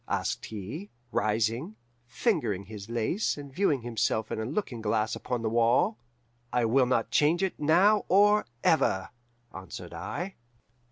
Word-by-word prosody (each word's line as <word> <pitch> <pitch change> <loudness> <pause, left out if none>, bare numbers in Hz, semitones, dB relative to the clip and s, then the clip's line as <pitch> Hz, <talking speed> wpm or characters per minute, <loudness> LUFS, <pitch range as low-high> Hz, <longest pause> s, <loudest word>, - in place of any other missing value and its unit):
asked - - -2
he, 110 - -7 0.2
rising, 115 - 0 0.3
fingering 120 - 0
his 105 0 -9
lace, 120 - 0
and 140 -2 -9
viewing 145 - +1
himself 110 -2 -1
in - - -2
a 110 - -2
looking 125 - -3
glass 110 0 0
upon 125 -2 -3
the 110 - +1
wall. 120 - +2 0.5
"'I 125 -1 +2
will 125 +3 +3
not 115 -2 0
change 155 +7 +3
it 190 - -2
now 190 +8 +4
or 205 +3 +4 0.2
ever,' 135 -11 +2 0.4
answered 95 -2 -8
I. 175 - -5
120 Hz, 145 wpm, -28 LUFS, 110-175 Hz, 0.5 s, now